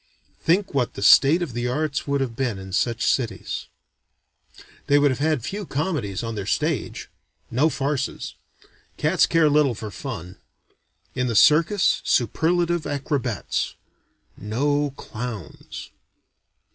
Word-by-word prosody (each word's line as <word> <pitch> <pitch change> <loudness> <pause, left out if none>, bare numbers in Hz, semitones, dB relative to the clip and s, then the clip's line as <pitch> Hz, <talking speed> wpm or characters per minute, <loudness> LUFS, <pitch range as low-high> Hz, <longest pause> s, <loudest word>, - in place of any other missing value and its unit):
Think 190 +3 +1
what 125 -5 0
the 100 - -4
state 155 - +6
of 145 -8 -5
the 120 +1 -2
arts 145 +3 -1
would 140 -1 +1
have 125 -4 -2
been 125 -5 -1
in 95 -1 -9
such 115 +4 0
cities. 115 - -1 1.2
They 145 0 +5
would 145 -1 +4
have 130 - -3
had 150 -4 +1
few 205 +9 -4
comedies 140 - -2
on 115 0 -3
their 100 -3 -5
stage; - - -1 0.4
no 140 +7 +3
farces. 140 -2 -2 0.6
Cats - - +3
care 165 -2 +4
little 145 -4 +3
for 105 0 -7
fun. 95 - -7 0.8
In 125 -1 -1
the 115 - -2
circus, 165 - +4
superlative 170 - +1
acrobats. 135 - -2 0.6
No 145 +8 0
clowns. 110 -5 -7
135 Hz, 130 wpm, -23 LUFS, 115-150 Hz, 1.2 s, state